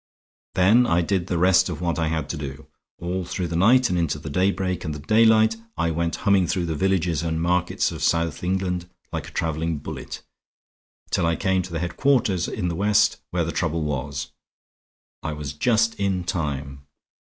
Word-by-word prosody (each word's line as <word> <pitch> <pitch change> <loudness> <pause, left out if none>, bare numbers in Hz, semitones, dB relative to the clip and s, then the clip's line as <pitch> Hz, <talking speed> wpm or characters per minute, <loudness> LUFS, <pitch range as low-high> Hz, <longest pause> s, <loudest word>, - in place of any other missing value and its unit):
"Then 110 +7 +5
I 85 +1 +3
did 95 0 -1
the 90 - -1
rest 90 +2 +4
of 85 - -4
what 85 -2 -1
I 80 - +1
had 80 -2 -2
to - - -2
do. 70 -3 -7 0.3
All 90 +2 -3
through 90 0 -3
the 85 - -3
night 120 +8 +5
and 90 - +1
into 80 -3 0
the 75 0 -7
daybreak 95 +1 0
and 80 -3 -3
the - - -7
daylight 110 +5 +4 0.2
I 85 0 +1
went 85 +1 -1
humming 100 -3 +4
through 90 +1 0
the 80 - -2
villages 90 -3 +1
and 80 -1 -1
markets 90 +1 +1
of - - -7
South 85 0 0
England 90 -1 -1 0.2
like - - -3
a - - -11
traveling 80 0 -1
bullet, 70 - -7 0.9
till 85 - +2
I 85 - +1
came 95 0 +1
to 90 0 -8
the 85 - -2
headquarters 95 - +1
in 90 - -2
the 85 - -2
West 105 +3 +3
where 85 -1 0
the 85 - -2
trouble 80 -2 -1
was. 70 -1 -3 0.9
I 80 - -3
was 75 -2 -5
just 115 +7 +2
in 95 -2 0
time. 70 -5 -4
85 Hz, 190 wpm, -24 LUFS, 80-95 Hz, 0.9 s, Then